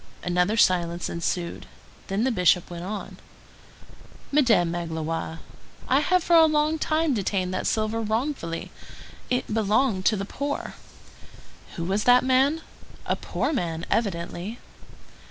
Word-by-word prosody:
Another 180 Hz, +4 st, +1 dB
silence 175 Hz, -4 st, +2 dB
ensued; 170 Hz, +1 st, -3 dB, 0.4 s
then 195 Hz, +3 st, 0 dB
the 260 Hz, -, +2 dB
Bishop 180 Hz, -4 st, +2 dB
went 170 Hz, 0 st, -6 dB
on:— 205 Hz, +3 st, -6 dB, 1.1 s
"Madame 230 Hz, -, +4 dB
Magloire, 165 Hz, -1 st, -4 dB, 0.5 s
I 265 Hz, -, +4 dB
have 365 Hz, +4 st, +2 dB
for 345 Hz, -, +3 dB
a 325 Hz, -1 st, +8 dB
long 305 Hz, +1 st, +1 dB
time 310 Hz, -1 st, +1 dB
detained 190 Hz, -4 st, -1 dB
that 185 Hz, -, -2 dB
silver 220 Hz, +1 st, 0 dB
wrongfully. 220 Hz, -, -2 dB, 0.6 s
It 250 Hz, -3 st, -1 dB
belonged 215 Hz, -1 st, +2 dB
to 220 Hz, -, +4 dB
the 195 Hz, -, -3 dB
poor. 285 Hz, +7 st, -4 dB, 1.0 s
Who 170 Hz, -, -4 dB
was 195 Hz, +4 st, -1 dB
that 245 Hz, 0 st, +6 dB
man? 265 Hz, +5 st, +3 dB, 0.4 s
A -, -, 0 dB
poor -, -, -2 dB
man, 170 Hz, -, -2 dB
evidently." 195 Hz, 0 st, -2 dB
210 Hz, 130 wpm, -25 LUFS, 175-260 Hz, 1.1 s, a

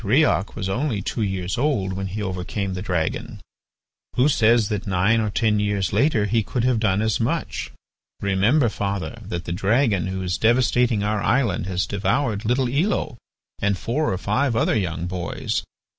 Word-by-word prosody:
Riok 120 Hz, -2 st, +2 dB
was 95 Hz, -4 st, -3 dB
only 115 Hz, 0 st, -1 dB
two 115 Hz, -, -3 dB
years 95 Hz, -1 st, -2 dB
old 110 Hz, -10 st, 0 dB
when 95 Hz, +1 st, -3 dB
he 105 Hz, +3 st, -4 dB
overcame 95 Hz, +1 st, -3 dB
the 90 Hz, -, -4 dB
dragon. 85 Hz, -5 st, -2 dB, 0.8 s
Who 130 Hz, +4 st, +4 dB
says 115 Hz, -4 st, +3 dB
that 105 Hz, -1 st, -3 dB
nine 100 Hz, +5 st, +2 dB
or 110 Hz, -, 0 dB
ten 105 Hz, 0 st, +1 dB
years 100 Hz, -2 st, 0 dB
later 110 Hz, -1 st, +3 dB
he 115 Hz, +2 st, +2 dB
could 115 Hz, +3 st, -2 dB
have 125 Hz, -2 st, +2 dB
done 105 Hz, -1 st, +1 dB
as 110 Hz, -1 st, +1 dB
much? 145 Hz, +8 st, -2 dB, 0.5 s
Remember, 105 Hz, +8 st, +2 dB
father, 100 Hz, -6 st, -3 dB
that 85 Hz, 0 st, -5 dB
the -, -, -4 dB
dragon 100 Hz, 0 st, +1 dB
who 95 Hz, 0 st, -3 dB
is 90 Hz, 0 st, -2 dB
devastating 120 Hz, -1 st, +3 dB
our 105 Hz, 0 st, 0 dB
island 115 Hz, -9 st, +1 dB
has 90 Hz, -1 st, 0 dB
devoured 105 Hz, +2 st, -1 dB
little 125 Hz, +3 st, +2 dB
Elo 145 Hz, -, -1 dB, 0.4 s
and 100 Hz, -1 st, +1 dB
four 150 Hz, +10 st, -1 dB
or 95 Hz, -, -1 dB
five 115 Hz, +7 st, 0 dB
other 115 Hz, -, +2 dB
young 85 Hz, -5 st, -1 dB
boys. 90 Hz, -1 st, -2 dB
105 Hz, 175 wpm, -23 LUFS, 95-120 Hz, 0.8 s, Who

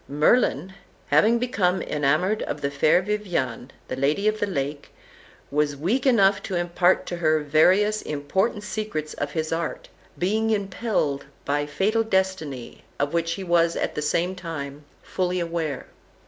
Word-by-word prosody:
Merlin, 155 Hz, -, +2 dB, 0.4 s
having 230 Hz, +2 st, +5 dB
become 205 Hz, -7 st, +1 dB
enamoured 155 Hz, +9 st, +1 dB
of 145 Hz, -, -3 dB
the 140 Hz, -, -1 dB
fair 155 Hz, +5 st, +3 dB
Viviane, 175 Hz, -, -2 dB, 0.2 s
the -, -, -3 dB
Lady 145 Hz, +10 st, +1 dB
of 215 Hz, 0 st, +1 dB
the 205 Hz, -, 0 dB
Lake, 145 Hz, -4 st, -3 dB, 0.6 s
was 145 Hz, 0 st, +1 dB
weak 225 Hz, -, 0 dB
enough 200 Hz, -6 st, +4 dB
to 190 Hz, -, -4 dB
impart 175 Hz, +1 st, +2 dB
to 175 Hz, -, -4 dB
her 155 Hz, -2 st, +2 dB
various 185 Hz, +9 st, +3 dB
important 190 Hz, +9 st, -1 dB
secrets 210 Hz, -8 st, -4 dB
of 145 Hz, 0 st, -4 dB
his 160 Hz, -1 st, -2 dB
art, 165 Hz, -1 st, -3 dB, 0.3 s
being 215 Hz, +5 st, +1 dB
impelled 195 Hz, -8 st, -1 dB, 0.2 s
by 145 Hz, +1 st, 0 dB
fatal 200 Hz, +10 st, +1 dB
destiny, 190 Hz, -, -2 dB
of 140 Hz, +2 st, -1 dB
which 165 Hz, 0 st, 0 dB
he 195 Hz, -, -5 dB
was 170 Hz, -1 st, +2 dB
at -, -, -1 dB
the -, -, -3 dB
same 170 Hz, +5 st, 0 dB
time 150 Hz, -5 st, -7 dB, 0.2 s
fully 180 Hz, -1 st, -1 dB
aware. 165 Hz, -5 st, -3 dB
170 Hz, 150 wpm, -24 LUFS, 150-200 Hz, 0.6 s, having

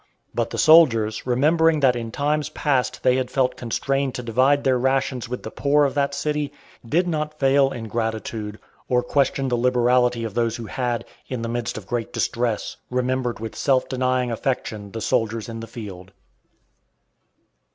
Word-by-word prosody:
But -, -, -1 dB
the -, -, -5 dB
soldiers, 120 Hz, -10 st, +5 dB
remembering 155 Hz, +5 st, +3 dB
that 130 Hz, -3 st, +4 dB
in 115 Hz, -1 st, -4 dB
times 150 Hz, +3 st, 0 dB
past 135 Hz, -4 st, -1 dB
they 125 Hz, 0 st, +4 dB
had 130 Hz, -1 st, -1 dB
felt 130 Hz, -1 st, +1 dB
constrained 135 Hz, +3 st, -1 dB
to 125 Hz, -, -4 dB
divide 130 Hz, +5 st, +2 dB
their 130 Hz, -2 st, +2 dB
rations 130 Hz, -1 st, 0 dB
with 125 Hz, -, -5 dB
the 110 Hz, -, -6 dB
poor 145 Hz, +1 st, +3 dB
of 140 Hz, -, -1 dB
that 140 Hz, -1 st, 0 dB
city, 150 Hz, 0 st, -1 dB, 0.3 s
did 165 Hz, +10 st, +1 dB
not 155 Hz, -2 st, -2 dB
fail 135 Hz, 0 st, +4 dB
in 115 Hz, -4 st, -6 dB
gratitude, 110 Hz, -1 st, -3 dB, 0.3 s
or 125 Hz, -1 st, +2 dB
question 135 Hz, +1 st, +1 dB
the 125 Hz, -, +1 dB
liberality 125 Hz, -1 st, +2 dB
of 110 Hz, -3 st, -4 dB
those 115 Hz, 0 st, 0 dB
who 120 Hz, -2 st, -6 dB
had, 120 Hz, 0 st, -2 dB, 0.2 s
in 125 Hz, -3 st, -4 dB
the 115 Hz, -, -3 dB
midst 120 Hz, -1 st, -3 dB
of 105 Hz, -, -8 dB
great 120 Hz, +2 st, -3 dB
distress, 120 Hz, -3 st, -1 dB
remembered 125 Hz, -1 st, -1 dB
with 110 Hz, 0 st, -6 dB
self 135 Hz, -2 st, +2 dB
denying 130 Hz, -1 st, 0 dB
affection 110 Hz, -4 st, -3 dB
the 115 Hz, -, -5 dB
soldiers 110 Hz, 0 st, 0 dB
in 115 Hz, -1 st, -6 dB
the 115 Hz, -, -7 dB
field. 100 Hz, -5 st, -9 dB
125 Hz, 170 wpm, -23 LUFS, 115-135 Hz, 0.3 s, soldiers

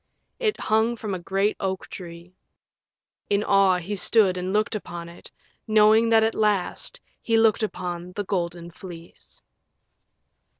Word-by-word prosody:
It 435 Hz, -4 st, 0 dB
hung 220 Hz, +2 st, +2 dB
from 215 Hz, -3 st, -5 dB
a 185 Hz, -, -3 dB
great 195 Hz, +4 st, 0 dB
oak 190 Hz, -1 st, -3 dB
tree. 170 Hz, -1 st, -10 dB, 1.0 s
In 205 Hz, 0 st, +2 dB
awe 195 Hz, -3 st, +4 dB
he 185 Hz, +4 st, -4 dB
stood 200 Hz, -1 st, +4 dB
and 185 Hz, +1 st, -3 dB
looked 210 Hz, +2 st, +1 dB
upon 175 Hz, -5 st, -6 dB
it, 170 Hz, -, -13 dB, 0.4 s
knowing 215 Hz, +1 st, +5 dB
that 225 Hz, -1 st, +5 dB
at 225 Hz, 0 st, +1 dB
last 210 Hz, -4 st, -1 dB, 0.2 s
he 225 Hz, -1 st, +1 dB
looked 225 Hz, 0 st, +4 dB
upon 180 Hz, -4 st, -4 dB
THE 205 Hz, -, -3 dB
GOLDEN 175 Hz, -3 st, -3 dB
FLEECE. 170 Hz, -2 st, -9 dB
195 Hz, 140 wpm, -24 LUFS, 180-215 Hz, 1.0 s, knowing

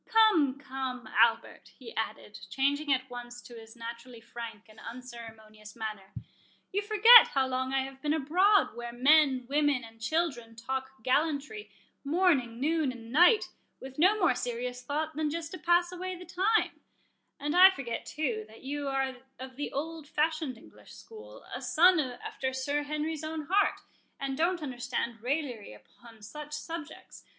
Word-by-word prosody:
—Come, 415 Hz, -, +4 dB
come, 260 Hz, -3 st, -5 dB
Albert," 230 Hz, 0 st, +2 dB
he 460 Hz, -, -11 dB
added, -, -, -5 dB
changing 285 Hz, +2 st, 0 dB
at 260 Hz, -1 st, +1 dB
once 245 Hz, -1 st, -9 dB
to 240 Hz, -, -13 dB
his 225 Hz, 0 st, -12 dB
naturally 235 Hz, +1 st, -9 dB
frank 225 Hz, -2 st, -9 dB
and 215 Hz, 0 st, -17 dB
unceremonious 225 Hz, -3 st, -11 dB
manner, 215 Hz, -4 st, -6 dB, 0.6 s
"you 405 Hz, -, 0 dB
forget 430 Hz, +3 st, +8 dB
how 270 Hz, -1 st, +3 dB
long 260 Hz, 0 st, -2 dB
I 270 Hz, 0 st, +1 dB
have 270 Hz, 0 st, -10 dB
been 295 Hz, -, -1 dB
abroad 360 Hz, -, +3 dB
where 240 Hz, 0 st, -6 dB
men, 265 Hz, 0 st, +4 dB
women, 290 Hz, -2 st, +1 dB
and 225 Hz, 0 st, -14 dB
children, 240 Hz, -4 st, -2 dB
talk 265 Hz, +1 st, -5 dB
gallantry 300 Hz, -, -1 dB, 0.3 s
morning, 285 Hz, -7 st, +1 dB
noon, 305 Hz, 0 st, +1 dB
and 230 Hz, -2 st, -11 dB
night, 355 Hz, -, +5 dB, 0.3 s
with 265 Hz, +2 st, -10 dB
no 380 Hz, +6 st, +5 dB
more 355 Hz, -8 st, +4 dB
serious 245 Hz, +1 st, -4 dB
thought 305 Hz, +4 st, -3 dB
than 310 Hz, 0 st, -1 dB
just 325 Hz, +1 st, -5 dB
to 370 Hz, -, -7 dB
pass 345 Hz, 0 st, +2 dB
away 370 Hz, +1 st, -5 dB
the 360 Hz, 0 st, -11 dB
time; 390 Hz, +6 st, 0 dB, 0.6 s
and 295 Hz, +3 st, -2 dB
I 370 Hz, +1 st, +10 dB
forget, 270 Hz, -11 st, -5 dB
too, 250 Hz, -8 st, -3 dB
that 220 Hz, +1 st, -16 dB
you 285 Hz, +1 st, -4 dB
are 270 Hz, -1 st, -1 dB, 0.2 s
of 260 Hz, 0 st, -9 dB
the 290 Hz, +2 st, -4 dB
old 315 Hz, +1 st, -5 dB
fashioned 305 Hz, -4 st, -1 dB
English -, -, -16 dB
school, 475 Hz, +3 st, -13 dB
a -, -, -5 dB
son 355 Hz, +2 st, +4 dB
after 260 Hz, 0 st, -4 dB
Sir 285 Hz, +3 st, -1 dB
Henry's 305 Hz, +1 st, -3 dB
own 315 Hz, 0 st, -4 dB
heart, 405 Hz, +1 st, +2 dB, 0.4 s
and 275 Hz, -1 st, -3 dB
don't 340 Hz, +2 st, 0 dB
understand 245 Hz, -3 st, -4 dB
raillery 250 Hz, -, -3 dB
upon 220 Hz, -, -17 dB
such 300 Hz, +7 st, -9 dB
subjects. 315 Hz, 0 st, -8 dB
275 Hz, 160 wpm, -29 LUFS, 240-320 Hz, 0.6 s, I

